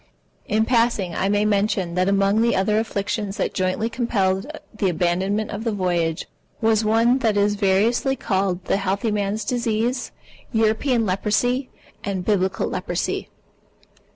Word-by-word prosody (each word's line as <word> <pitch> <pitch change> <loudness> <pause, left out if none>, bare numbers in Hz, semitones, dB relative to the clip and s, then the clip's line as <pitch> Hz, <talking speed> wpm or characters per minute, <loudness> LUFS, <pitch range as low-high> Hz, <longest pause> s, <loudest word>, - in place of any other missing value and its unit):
In 220 +1 +2
passing, 230 -7 +1
I 190 +4 0
may 205 +1 +2
mention 200 -4 +1
that 185 +2 +1
among 200 +2 +3
the 235 0 +2
other 210 +3 +2
afflictions 205 -1 -3
that - - -1
jointly 185 +4 0
compelled 210 -4 0 0.3
the 205 -3 0
abandonment 185 +5 0
of 210 +1 -5
the 230 - 0
voyage, 175 -5 -1 0.3
was 220 -1 +2
one 230 +4 +3
that 220 -5 +1
is 205 0 +3
variously 210 +6 +2
called 190 -5 -1
the - - +1
healthy 200 +3 -1
man's 205 +1 -1
disease, 240 +1 -1 0.4
European 225 +2 +2
Leprosy, 225 +7 0 0.3
and 190 -3 -3
Biblical 190 -2 +1
Leprosy. - - -3
205 Hz, 140 wpm, -22 LUFS, 190-225 Hz, 0.4 s, among